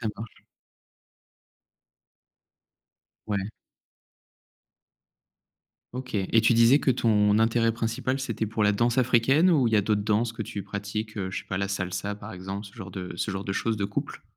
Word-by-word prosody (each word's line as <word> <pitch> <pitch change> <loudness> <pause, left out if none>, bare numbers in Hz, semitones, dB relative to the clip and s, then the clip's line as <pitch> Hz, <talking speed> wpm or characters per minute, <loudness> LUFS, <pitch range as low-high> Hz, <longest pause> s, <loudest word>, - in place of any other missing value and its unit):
ça 115 - -2
marche. 110 0 -10 2.8
Ouais. 100 0 -2 2.4
OK 125 -1 -6
et 105 +3 +2
tu 115 +1 +4
disais 115 +5 +6
que 135 - +1
ton, 105 -3 +3
intérêt 115 +1 +3
principal, 115 +4 -2
c'était 115 -4 -2
pour 110 0 -2
la 105 - +4
danse 120 +4 +1
africaine 130 +7 +4
ou 145 -7 +3
il 110 - 0
y 105 - +4
d'autres 105 0 +1
danses 110 +2 +1
que 115 - -10
tu 100 0 -6
pratiques, 105 +3 -5
heu, 95 -1 -3
je - - -3
sais - - -17
pas 95 - -2
la 100 0 -1
salsa 100 +1 -3
par 105 - -10
exemple, 95 +3 -6
ce 100 - -14
genre 95 0 -8
de 90 -1 -6
ce 95 - -2
genre 95 0 -4
de 95 - -2
choses 110 +3 -1
de 100 - -2
couple? 100 - -4
110 Hz, 170 wpm, -26 LUFS, 100-115 Hz, 2.8 s, disais